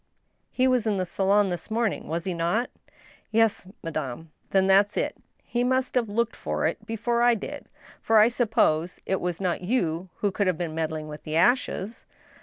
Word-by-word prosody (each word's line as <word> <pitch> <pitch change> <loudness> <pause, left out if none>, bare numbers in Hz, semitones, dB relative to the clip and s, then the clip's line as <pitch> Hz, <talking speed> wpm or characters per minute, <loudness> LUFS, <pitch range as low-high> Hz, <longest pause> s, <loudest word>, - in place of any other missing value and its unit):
He 255 0 +2
was 250 -3 +2
in 205 -2 +1
the 185 - 0
salon 195 +2 +2
this 175 +3 -5
morning, 225 -1 -1
was 165 +1 -2
he 185 - -2
not? 175 +8 0 0.2
" - - -27
" - - -32
Yes, 225 -4 +2 0.2
madame." 155 -1 -5
" - - -41
Then 190 -1 +3
that's 200 +2 +4
it - - -1 0.3
He 240 0 -1
must 260 +1 +1
have 240 -4 +1
looked 235 +2 0
for - - -2
it - - -1
before 235 +1 0
I 240 0 +5
did; 210 - -7 0.3
for 225 - +3
I 215 +1 +8
suppose 220 -9 +1
it 190 - -1
was 175 -1 -2
not 180 -3 -1
you 180 -4 -1
who 205 -2 -1
had 185 -5 +1
been 170 -2 -3
meddling 155 -1 -3
with 150 0 -8
the 155 - -5
ashes? 225 +1 +1
195 Hz, 200 wpm, -26 LUFS, 170-230 Hz, 0.3 s, I